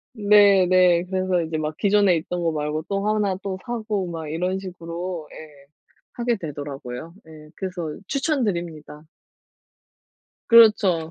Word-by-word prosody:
네 205 Hz, -3 st, +5 dB
네. 180 Hz, -1 st, +4 dB
그래서 185 Hz, -1 st, 0 dB
이제 160 Hz, -1 st, -4 dB
막 155 Hz, 0 st, -3 dB
기존에 200 Hz, -3 st, +3 dB
있던 175 Hz, +2 st, -4 dB
거 165 Hz, -, +1 dB
말고 150 Hz, +1 st, -3 dB
또 200 Hz, +1 st, -1 dB
1 210 Hz, -3 st, +1 dB
또 195 Hz, -2 st, -4 dB
사고 215 Hz, -5 st, -3 dB
막 165 Hz, -2 st, -6 dB
이런 180 Hz, +4 st, -2 dB
식으로 175 Hz, -2 st, -6 dB
예. 145 Hz, -3 st, -13 dB, 0.5 s
하게 240 Hz, 0 st, -1 dB
되더라고요. 145 Hz, -2 st, -7 dB
예. 155 Hz, -1 st, -14 dB
그래서 180 Hz, -4 st, -5 dB, 0.2 s
추천 275 Hz, 0 st, 0 dB
드립니다. 165 Hz, -6 st, -4 dB, 1.5 s
그렇죠. 210 Hz, -8 st, +5 dB
180 Hz, 255 characters per minute, -23 LUFS, 160-200 Hz, 1.5 s, 네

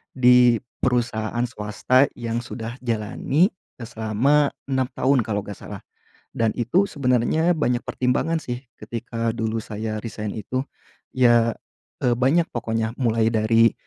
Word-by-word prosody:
di 125 Hz, -2 st, +6 dB, 0.3 s
perusahaan 120 Hz, -2 st, 0 dB
swasta 125 Hz, +4 st, +1 dB
yang 115 Hz, -1 st, -3 dB
sudah 115 Hz, 0 st, -6 dB
jalani, 120 Hz, -, +1 dB, 0.3 s
eee, 115 Hz, -, -7 dB
selama 120 Hz, +7 st, +2 dB, 0.2 s
6 130 Hz, -2 st, 0 dB
tahun 135 Hz, 0 st, +2 dB
kalau 105 Hz, -1 st, -2 dB
enggak 105 Hz, -, -8 dB
salah. -, -, -8 dB, 0.5 s
Dan 115 Hz, -1 st, 0 dB
itu 150 Hz, -, +2 dB
sebenarnya 140 Hz, +5 st, +2 dB
banyak 125 Hz, -5 st, 0 dB
pertimbangan 130 Hz, +6 st, 0 dB
sih 125 Hz, -3 st, -5 dB, 0.2 s
ketika 115 Hz, -1 st, -3 dB
dulu 110 Hz, 0 st, -1 dB
saya 110 Hz, 0 st, -4 dB
resign 105 Hz, -2 st, -5 dB
itu. 125 Hz, +5 st, -2 dB, 0.5 s
Iya, 120 Hz, -3 st, +4 dB, 0.5 s
eee, 125 Hz, -1 st, +4 dB
banyak 140 Hz, +7 st, +2 dB
pokoknya 115 Hz, -1 st, -2 dB
mulai 115 Hz, -2 st, +2 dB
dari, 115 Hz, +1 st, +4 dB
120 Hz, 130 wpm, -23 LUFS, 110-130 Hz, 0.5 s, di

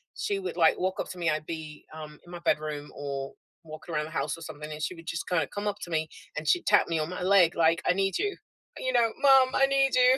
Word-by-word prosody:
she 405 Hz, -2 st, -2 dB
would, 380 Hz, -, -5 dB
like, 165 Hz, -2 st, +4 dB
walk 185 Hz, +1 st, -1 dB
up -, -, -3 dB
to 185 Hz, -, -8 dB
me 170 Hz, -2 st, 0 dB
I'd 155 Hz, 0 st, -1 dB
be, 155 Hz, -2 st, -7 dB
um, 155 Hz, -1 st, -9 dB
in 175 Hz, -, -14 dB
my 175 Hz, -, -7 dB
bedroom 150 Hz, -2 st, -1 dB
or 140 Hz, -1 st, -5 dB, 0.3 s
walking 155 Hz, +2 st, -9 dB
around 150 Hz, 0 st, 0 dB
the 155 Hz, -, -10 dB
house 150 Hz, -1 st, -2 dB
or -, -, -13 dB
something, 155 Hz, -1 st, -8 dB
and 150 Hz, 0 st, -7 dB
she 180 Hz, -, -2 dB
would 165 Hz, 0 st, -14 dB
just 170 Hz, -, -4 dB
kinda 175 Hz, -3 st, +1 dB
come 205 Hz, +1 st, -3 dB
up 205 Hz, -1 st, -1 dB
to -, -, -7 dB
me, 160 Hz, -1 st, 0 dB, 0.3 s
and 155 Hz, -, -4 dB
she'd 175 Hz, +4 st, +2 dB
tap -, -, +4 dB
me 165 Hz, -1 st, 0 dB
on 155 Hz, +2 st, -2 dB
my 180 Hz, -, -5 dB
leg 185 Hz, -3 st, +5 dB
like, 165 Hz, +1 st, +3 dB
"I -, -, +5 dB
need 195 Hz, 0 st, 0 dB
you." 410 Hz, -1 st, -2 dB, 0.4 s
You 255 Hz, 0 st, -1 dB
know, 235 Hz, -2 st, +4 dB
"Mom, 270 Hz, -2 st, +6 dB
I 270 Hz, -, +5 dB
need 270 Hz, -1 st, +2 dB
you." 255 Hz, +1 st, +6 dB
170 Hz, 270 wpm, -28 LUFS, 155-200 Hz, 0.4 s, Mom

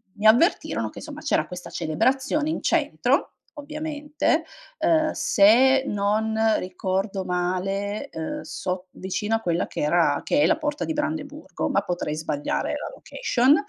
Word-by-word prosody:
mi 210 Hz, -, -5 dB
avvertirono 240 Hz, -, +4 dB
che -, -, -16 dB
insomma -, -, -8 dB
c'era -, -, +1 dB
questa 180 Hz, 0 st, -8 dB
celebrazione 265 Hz, -, 0 dB
in 320 Hz, -, -3 dB
centro, -, -, +1 dB, 0.3 s
ovviamente, 300 Hz, +1 st, -1 dB, 0.3 s
ehm, 315 Hz, -1 st, +3 dB
se 260 Hz, +6 st, +5 dB
non 210 Hz, +2 st, 0 dB, 0.2 s
ricordo 190 Hz, +1 st, -2 dB
male, 195 Hz, +6 st, -2 dB
ehm, 160 Hz, -1 st, -5 dB
sot 180 Hz, +3 st, -4 dB
vicino 210 Hz, +4 st, -3 dB
a 225 Hz, -, 0 dB
quella 175 Hz, -3 st, 0 dB
che -, -, -7 dB
era 150 Hz, -1 st, +2 dB
che 285 Hz, -, +2 dB
è -, -, +5 dB
la 315 Hz, -, +3 dB
porta 295 Hz, -1 st, -2 dB
di 320 Hz, -, -2 dB
Brandeburgo, 300 Hz, 0 st, -3 dB
ma -, -, +2 dB
potrei 175 Hz, -4 st, -3 dB
sbagliare 150 Hz, -2 st, -2 dB
la -, -, -5 dB
location. 270 Hz, -, +2 dB
215 Hz, 145 wpm, -24 LUFS, 180-295 Hz, 0.3 s, se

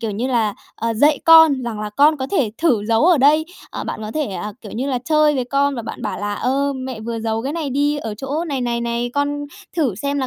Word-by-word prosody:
kiểu 225 Hz, -2 st, -2 dB
như 215 Hz, +5 st, -2 dB
là, 230 Hz, -5 st, 0 dB, 0.2 s
ờ, 230 Hz, +1 st, -2 dB
dạy 290 Hz, +5 st, +3 dB
con 320 Hz, -5 st, +7 dB
rằng 225 Hz, -3 st, -4 dB
là 210 Hz, 0 st, -4 dB
con 290 Hz, +8 st, +4 dB
có 265 Hz, -2 st, -3 dB
thể 280 Hz, -, +1 dB
thử 255 Hz, -11 st, +2 dB
giấu 225 Hz, +4 st, +3 dB
ở 355 Hz, -4 st, +5 dB
đây. 295 Hz, +4 st, +4 dB, 0.3 s
À, -, -, -5 dB
bạn -, -, -5 dB
có 215 Hz, -, -5 dB
thể, 310 Hz, -1 st, 0 dB
à, 210 Hz, 0 st, -5 dB
kiểu 210 Hz, -, -10 dB
như 250 Hz, +5 st, -3 dB
là, 255 Hz, -, 0 dB
chơi 305 Hz, 0 st, +3 dB
với 255 Hz, -2 st, -1 dB
con 280 Hz, +2 st, +1 dB
và 235 Hz, -, -4 dB
bạn -, -, -7 dB
bảo -, -, -3 dB
là 205 Hz, 0 st, -2 dB
"Ơ, 275 Hz, +5 st, 0 dB
mẹ 260 Hz, -3 st, -6 dB
vừa 230 Hz, +1 st, -4 dB
giấu 225 Hz, 0 st, -2 dB
cái 275 Hz, +3 st, -3 dB
này 315 Hz, -4 st, -3 dB
đi 290 Hz, +3 st, +1 dB
ở 225 Hz, -7 st, -5 dB
chỗ 275 Hz, +9 st, -3 dB
này, 280 Hz, -6 st, -3 dB
này, 240 Hz, -1 st, -1 dB
này, 235 Hz, +1 st, -2 dB
con 290 Hz, 0 st, -1 dB, 0.3 s
thử 280 Hz, -, +1 dB
xem 280 Hz, +8 st, -2 dB
là 265 Hz, -, -1 dB
260 Hz, 270 wpm, -20 LUFS, 225-290 Hz, 0.3 s, con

